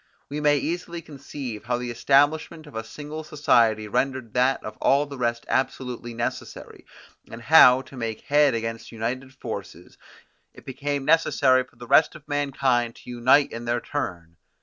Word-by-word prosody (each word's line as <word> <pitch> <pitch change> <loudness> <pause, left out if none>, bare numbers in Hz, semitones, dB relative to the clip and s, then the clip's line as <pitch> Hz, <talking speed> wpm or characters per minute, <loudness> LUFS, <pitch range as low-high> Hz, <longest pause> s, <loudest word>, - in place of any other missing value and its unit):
We 150 +1 -4
may 145 -1 +4
easily 170 +2 -4
conceive 135 -6 -8
how 120 0 0
the 120 0 -4
establishment 145 +6 +2
of 150 - -14
a 110 - -4
single 150 +6 -8
society 115 -8 +2
rendered 125 0 -2
that 130 +2 +1
of 110 - -7
all 140 +2 +3
the 140 -1 -9
rest 120 -1 -1
absolutely 125 -2 -2
necessary, 120 +2 -6 0.4
and 115 - -9
how, 130 0 +7
to 135 - -14
make 115 -3 -4
head 145 -3 +3
against 115 0 -5
united 125 +4 -4
forces, 100 - -8 0.6
it - - -15
became 140 +1 -3
necessary 140 -5 +3
for 125 - -25
the 120 +1 -11
rest 155 - +4
of - - -14
mankind 135 -5 0
to - - -11
unite 130 +4 +3
in 115 +1 -7
their 120 +1 0
turn. 85 - -5
130 Hz, 165 wpm, -24 LUFS, 115-145 Hz, 0.6 s, how